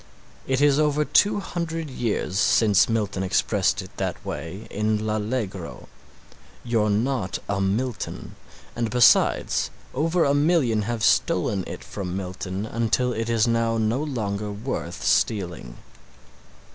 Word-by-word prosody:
It 130 +1 +1
is 145 0 +4
over 150 0 +2
two 205 +5 +3
hundred 165 -4 -4
years 110 -6 -2
since 105 0 +4
Milton 105 -4 -1
expressed 95 - +1
it - - -14
that - - -3
way 90 +8 -6
in 105 +1 0
"L'Allegro." 105 -4 -3 0.7
You're 115 -3 +1
not 110 -1 0
a 100 -1 -1
Milton 110 +5 -3 0.4
and 115 -1 -1
besides 125 0 +4 0.2
over 165 +5 +1
a 140 - +3
million 145 -7 +2
have 115 -2 -2
stolen 110 - +2
it - - -7
from 95 -2 -5
Milton 95 +1 -4
until 115 +2 0
it 115 +1 -3
is 115 -1 +2
now 115 -1 +1
no 110 +4 0
longer 105 -8 -3
worth 110 +6 -5
stealing. 85 - 0
115 Hz, 130 wpm, -24 LUFS, 100-130 Hz, 0.7 s, is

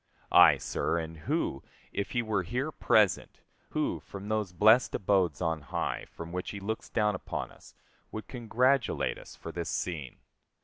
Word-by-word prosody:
Ay, - - +8
sir, - - -1
and 80 -1 -4
who, 75 -3 -2 0.3
if 100 - -2
he 120 - 0
were 110 -3 0
here 125 - -2
present, 105 - +2 0.3
who - - -1
from 100 +1 -9
those 110 -4 0
blest 110 +7 +5
abodes 95 -5 +1
on 80 -2 0
high 70 - -3
from 85 0 -8
which 90 +1 -3
he 100 - -5
looks 110 +3 -4
down 105 -2 +2
upon 90 - -4
us - - -17 0.4
would 110 - -6
congratulate 125 +1 +1
us - - -12
for - - -8
this - - -4
scene. 75 -8 -3
100 Hz, 165 wpm, -30 LUFS, 85-110 Hz, 0.4 s, Ay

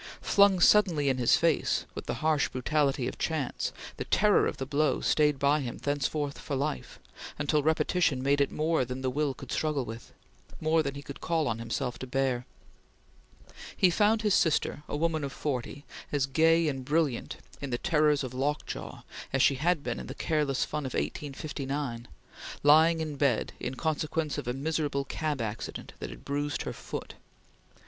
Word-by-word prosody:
Flung 200 -2 +5
suddenly 170 -7 +5
in 130 -1 0
his 120 - +5
face, 165 -3 +1
with - - -7
the - - -1
harsh 155 -3 +3
brutality 135 -1 0
of - - -6
chance, 155 -6 -2 0.3
the - - -4
terror 210 0 +4
of - - -4
the 135 - -3
blow 145 +1 +1
stayed 150 -2 +2
by 140 +2 +3
him 125 -4 -4
thenceforth 145 0 -2
for 145 - -4
life, 130 - -3 0.4
until 150 +1 +1
repetition 160 -2 +1
made 140 +1 +3
it 140 - +1
more 160 -2 +1
than 125 +2 -5
the 130 - 0
will 145 0 0
could - - -10
struggle 150 -4 0
with; 115 +1 -9 0.5
more 160 +1 +3
than 140 -2 -3
he 140 - -7
could 140 +1 -9
call 165 -3 0
on 115 -1 -1
himself 115 +1 -3
to 130 - -6
bear. 130 -1 0 1.3
He 185 - +5
found 215 +4 +3
his 210 -2 +3
sister, 155 -3 +2
a - - -2
woman 160 -1 0
of 140 - -3
forty, 140 0 -4 0.3
as 145 -3 +1
gay 165 +4 +3
and 135 -3 -2
brilliant 145 -2 0 0.2
in 140 - -4
the 120 - -1
terrors 150 -3 +2
of 130 -1 -5
lockjaw 145 +3 -3 0.3
as 135 - +2
she - - +5
had 170 -2 +2
been 120 -1 -3
in - - -7
the - - -7
careless 150 -4 0
fun 150 -3 -3
of 130 - -6
1859, 140 -4 -4 0.6
lying 160 +3 +6
in 155 -2 -4
bed 135 -5 +1
in 130 - -4
consequence 155 0 -1
of - - -7
a 125 - 0
miserable 145 0 -1
cab 150 -1 -2
accident 110 -1 -5
that 60 - -5
had 60 -1 -11
bruised 145 +1 -2
her - - -4
foot. - - -7
145 Hz, 180 wpm, -29 LUFS, 135-155 Hz, 1.3 s, lying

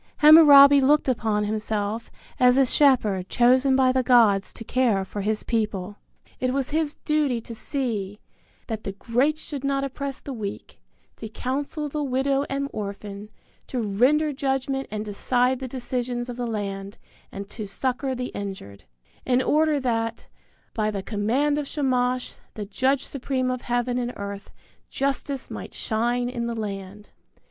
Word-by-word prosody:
Hammurabi 285 -2 +9
looked 290 +3 +3
upon 220 -4 0
himself 215 +1 -2 0.3
as 250 0 +5
a 270 - +5
shepherd 220 -9 +2
chosen 255 +2 +4
by 260 -1 +4
the 260 0 +2
gods 225 -6 +4
to - - -7
care 230 -5 +1
for 205 +2 -5
his 215 +2 -1
people. 210 -3 -2 0.4
It 255 0 0
was 270 0 -2
his 310 -1 0
duty 295 -5 +1
to 230 - -7
see 220 -6 -3 0.5
"that 220 -2 -5
the 195 - -4
great 250 +9 0
should 285 -3 -7
not 275 0 0
oppress 275 0 -4
the 275 - -7
weak, 205 -4 -7 0.4
to 220 - -7
counsel 280 +6 -3
the 295 +1 -3
widow 275 +1 0
and 275 0 -2
orphan, 200 0 -6 0.4
to 255 - -3
render 255 +9 +2
judgment 270 0 -2
and 215 0 -4
decide 245 +5 +1
the 260 - -5
decisions 245 -1 -3
of 245 - -5
the 245 0 -3
land, 200 -2 -4 0.3
and 200 0 -7
to 215 -2 -6
succor 260 +5 -2
the 250 0 -4
injured," 190 - -7 0.4
in 250 -1 +2
order 305 +2 +2
that 230 -3 -2 0.5
"by 215 -1 0
the 200 -2 -4
command 245 +9 0
of 290 - -4
Shamash, 255 -4 -1 0.2
the 210 - -5
judge 260 +7 0
supreme 260 -1 -2
of 255 -1 -3
heaven 245 +1 -1
and 245 0 -3
earth, 200 0 -7 0.4
justice 275 0 -2
might - - -7
shine 240 +2 -1
in 235 -1 -3
the 235 - -3
land." 200 0 -7
245 Hz, 155 wpm, -24 LUFS, 210-270 Hz, 0.5 s, Hammurabi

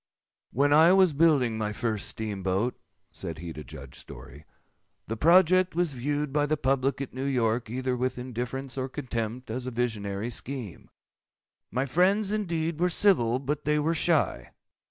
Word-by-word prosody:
"When 145 +4 +3
I 160 +4 +7
was 190 -4 +5
building 140 -7 +3
my 105 -1 -2
first 110 -2 -2
steam 105 -3 -4
boat," 95 +6 0 0.4
said 85 -2 -5
he 85 0 -7
to 75 - -8
Judge 65 0 -11
Story, 70 +5 -9 0.6
"the 115 - -4
project 180 +5 +4
was 175 -4 +1
viewed 145 +2 -2
by 145 0 +2
the 155 +1 0
public 135 -1 0
at 140 - -5
New 130 +2 -4
York 120 -3 0
either 130 +1 -1
with 125 +1 -2
indifference 125 +2 -4
or 130 +1 -2
contempt, 115 -1 -4
as 125 +2 -4
a - - 0
visionary 110 -3 -2
scheme. 120 -5 -7 0.8
My 130 +3 -1
friends, 190 - +2
indeed, 170 -6 -1
were 180 +1 +3
civil, 155 - +3
but 140 +3 -3
they 150 0 +1
were 155 +2 +1
shy. 155 - +1
130 Hz, 165 wpm, -27 LUFS, 115-150 Hz, 0.8 s, I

